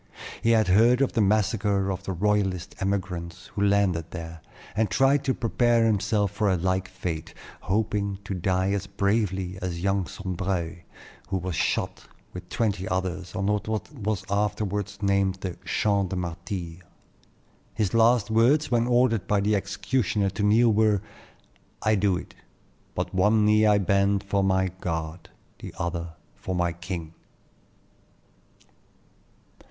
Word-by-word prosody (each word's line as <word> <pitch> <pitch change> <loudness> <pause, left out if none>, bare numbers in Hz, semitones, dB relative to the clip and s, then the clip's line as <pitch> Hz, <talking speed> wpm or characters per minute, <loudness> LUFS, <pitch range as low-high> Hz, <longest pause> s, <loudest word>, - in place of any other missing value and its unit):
He 115 - +1
had 110 -2 +4
heard 115 +7 +5
of 135 - +1
the 115 - +2
massacre 100 -1 +1
of 95 0 -4
the 95 - -5
royalist 95 -1 0
emigrants 90 -3 -3
who 100 - -3
landed 100 -5 +2
there, 85 -2 -8 0.3
and 110 -1 +1
tried 135 +8 +3
to 130 - +1
prepare 120 -1 +2
himself 105 -1 +1
for 105 0 0
a 95 - +2
like 95 +2 0
fate, 85 -3 -5 0.2
hoping 100 0 -1
to 100 - -4
die 95 +1 0
as 100 -1 -2
bravely 100 -2 -1
as 85 -2 -4
young 95 -1 +1
Sombreuil, 95 -3 -3 0.5
who 95 - -1
was 90 0 -4
shot - - -1 0.3
with 90 0 -9
twenty 100 -5 -1
others 95 -1 -3
on 95 - -1
what 105 +1 0 0.3
was 110 -6 -2
afterward 105 -1 -1
named 100 -1 +2
the 90 -2 -4
"Champ 100 -3 +1
des 95 - -3
Martyrs." 85 0 -5 1.0
His 105 -3 0
last 115 -1 +4
words, 130 +7 +3
when 120 0 +2
ordered 120 -3 +2
by 105 - +2
the 105 +2 +2
executioner 105 -1 0
to 100 - -5
kneel, 110 +3 +4
were, 105 -2 +3 0.8
"I 110 - +3
do 100 -3 +2
it; - - -9 0.6
but - - -3
one 105 +3 +3
knee 105 0 +4
I 105 -1 +5
bend 100 0 +2
for 100 -1 0
my 95 -1 +2
God, 80 0 -4 0.3
the - - -9
other 85 -1 -4 0.2
for 95 - -5
my 90 -1 0
king." 85 -2 -6
100 Hz, 145 wpm, -26 LUFS, 90-105 Hz, 1.0 s, heard